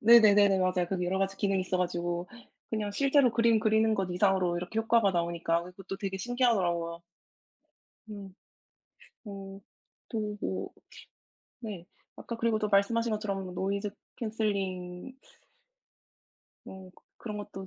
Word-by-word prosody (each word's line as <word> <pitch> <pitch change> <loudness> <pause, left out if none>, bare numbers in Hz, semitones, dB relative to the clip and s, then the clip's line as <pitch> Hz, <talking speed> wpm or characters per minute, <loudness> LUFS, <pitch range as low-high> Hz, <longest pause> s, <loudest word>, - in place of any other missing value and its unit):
네네네네 205 -4 +7
맞아요. 185 -1 +1
그게 180 -1 -1
여러 190 +2 0
가지 195 0 -1
기능이 195 -1 +1
있어 185 0 -1
가지고 175 0 -2 0.4
그냥 215 -2 -1
실제로 275 +2 +4
그림 230 -1 +4
그리는 220 0 +3
것 190 -2 -1
이상으로 180 -1 +2
이렇게 180 +5 -3
효과가 225 -2 +3
나오니까 170 -1 0
이 - - -8
그것도 195 +1 -7
되게 195 -1 -3
신기하더라고요. 185 -8 +1 1.1
음 200 -2 -8 0.9
어 195 -2 -8 0.5
또 210 -2 -2
뭐 190 - -3 0.9
네. 205 -7 -7 0.3
아까 235 - -6
그리고 230 -1 +1
또 215 -1 -1
말씀하신 230 +4 +2
것처럼 195 -4 -3
노이즈 200 +3 -2 0.2
캔슬링 200 -2 -3 1.5
뭐 190 -1 -10 0.3
그런 215 -3 -6
것도 195 -2 -7
195 Hz, 300 characters per minute, -30 LUFS, 185-220 Hz, 1.5 s, 네네네네